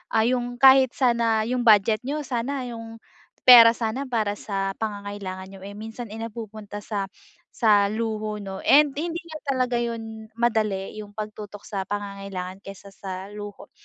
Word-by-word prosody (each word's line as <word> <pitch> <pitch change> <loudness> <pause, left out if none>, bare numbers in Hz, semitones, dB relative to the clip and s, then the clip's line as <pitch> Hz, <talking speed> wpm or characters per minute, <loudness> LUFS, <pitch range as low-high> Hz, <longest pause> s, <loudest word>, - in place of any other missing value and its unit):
ah, 220 +1 +3
yung 245 -1 -1
kahit 265 -1 +7
sana 230 -4 +1
yung 250 0 -1
budget 215 -1 +4
niyo 290 +3 -3
sana, 255 +1 -2
yung 230 -1 -8 0.5
pera 235 -2 +11
sana 230 +3 -2
para 215 -3 0
sa 195 -1 -3
pangangailangan 205 -3 -5
niyo 195 0 -12
eh, 200 - -7
minsan 225 +1 -7
ay 220 - -7
napupunta 215 -2 -7
sa 200 -2 -3 0.5
sa 205 -4 +4
luho, 215 -1 -3
'no. 195 -2 -7
And 290 0 +5
hindi 330 +4 -3
nga 315 -2 -8 0.2
talaga 250 -2 0
yun 225 -2 -5
madali, 215 -4 0
yung 205 -1 -11
pagtutok 210 -1 -7
sa 195 -3 -4
pangangailangan 195 -2 -5
kaysa 195 0 -11
sa 190 0 -7
luho, 205 -1 -9
220 Hz, 155 wpm, -24 LUFS, 205-240 Hz, 0.5 s, pera